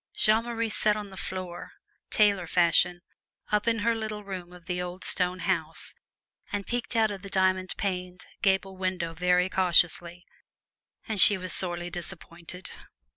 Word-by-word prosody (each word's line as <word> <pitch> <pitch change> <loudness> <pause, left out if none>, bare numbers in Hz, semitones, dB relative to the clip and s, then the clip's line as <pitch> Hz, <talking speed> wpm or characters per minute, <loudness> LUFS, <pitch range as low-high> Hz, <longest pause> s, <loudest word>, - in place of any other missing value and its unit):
Jeanne 220 +2 +3
Marie 230 -1 -2
sat 215 -1 +1
on 205 -2 -7
the - - -10
floor, 185 -2 -6 0.4
tailor 200 -4 +3
fashion, 175 +1 +3 0.5
up 210 +1 +1
in 230 -1 +2
her 235 - +4
little 215 -2 -4
room 185 -3 -7
of 180 -1 -14
the 180 0 -2
old 180 +1 -6
stone 180 0 0
house, - - -2 0.6
and 200 -1 -3
peeked 245 0 -3
out 220 -2 +3
of 195 -2 -6
the 195 - -9
diamond 185 -1 +1
paned 180 -2 -4 0.2
gable 190 -1 +1
window 185 -3 -2
very 180 +2 +2
cautiously; 175 -1 +3 0.8
and 215 -4 +2
she 205 - +8
was 185 -2 -4
sorely 175 -1 -1
disappointed. 175 0 -8
185 Hz, 155 wpm, -27 LUFS, 180-205 Hz, 0.8 s, she